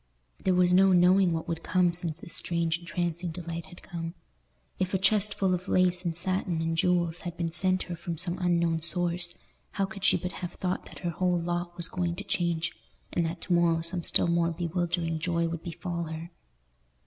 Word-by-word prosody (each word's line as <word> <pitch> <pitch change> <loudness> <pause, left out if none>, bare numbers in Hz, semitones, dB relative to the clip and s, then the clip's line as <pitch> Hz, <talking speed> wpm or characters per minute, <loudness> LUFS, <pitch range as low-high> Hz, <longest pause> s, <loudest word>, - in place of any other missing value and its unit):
There 185 -1 +3
was 180 0 +5
no 190 +1 +6
knowing 180 +1 +5
what 165 -1 -2
would 165 -1 -3
come, 180 -2 +2
since 170 -2 -3
this 165 - -8
strange 165 -1 0
entrancing 175 0 -2
delight 170 0 -5
had 175 -1 -14
come. 165 0 -5 0.6
If 185 +1 0
a - - +4
chest 205 +2 +3
full 190 -2 +2
of 180 +1 -3
lace 180 -1 +3
and 165 -2 -1
satin 185 -1 0
and 165 0 0
jewels 175 0 +1
had 175 -1 -6
been 165 -1 -1
sent 185 +2 +1
her 175 - -5
from 170 0 -5
some 175 +2 +1
unknown 170 -2 +2
source, 175 +1 +1 0.4
how 195 - +1
could 195 -1 -9
she - - +5
but 180 - -4
have 175 - -4
thought 185 0 -2
that - - -12
her 170 - +1
whole 180 +1 +1
lot 175 +1 -3
was 170 -1 +1
going 175 -1 -2
to 200 - -6
change, 170 -4 0 0.4
and 170 -2 +1
that 165 +1 -5
to 180 - -1
morrow 170 -1 +3
some 170 +1 0
still - - +2
more 170 0 +2
bewildering 170 -1 -1
joy 170 0 0
would 165 -1 -4
befall 170 0 -4
her? 160 +2 -6
175 Hz, 205 wpm, -28 LUFS, 170-180 Hz, 0.6 s, no